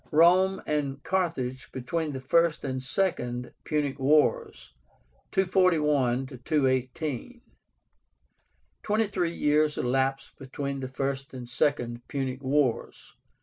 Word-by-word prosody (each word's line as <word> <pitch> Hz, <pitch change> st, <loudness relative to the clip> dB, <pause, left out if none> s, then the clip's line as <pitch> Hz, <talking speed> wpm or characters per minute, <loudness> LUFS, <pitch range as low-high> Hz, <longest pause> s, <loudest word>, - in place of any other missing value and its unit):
ROME 180 Hz, +4 st, +5 dB
AND 145 Hz, -2 st, -2 dB
CARTHAGE 160 Hz, -9 st, -2 dB
BETWEEN 150 Hz, +5 st, -3 dB
THE 130 Hz, -, -4 dB
FIRST 165 Hz, +4 st, +2 dB
AND 130 Hz, -1 st, -2 dB
SECOND 125 Hz, -6 st, -2 dB
PUNIC 145 Hz, -3 st, -1 dB
WARS 150 Hz, +3 st, +1 dB, 0.6 s
(241 150 Hz, -9 st, +2 dB, 0.2 s
218). 140 Hz, -, -1 dB, 1.4 s
Twenty 220 Hz, +1 st, +1 dB
three 175 Hz, -4 st, -1 dB
years 150 Hz, 0 st, +2 dB
elapsed 135 Hz, +2 st, -1 dB
between 140 Hz, +1 st, -4 dB
the 130 Hz, -, -4 dB
First 135 Hz, +1 st, -4 dB
and 125 Hz, -2 st, -7 dB
Second 120 Hz, -1 st, 0 dB
Punic 135 Hz, -1 st, -3 dB
Wars. 135 Hz, -2 st, -1 dB
140 Hz, 105 wpm, -27 LUFS, 130-165 Hz, 1.4 s, ROME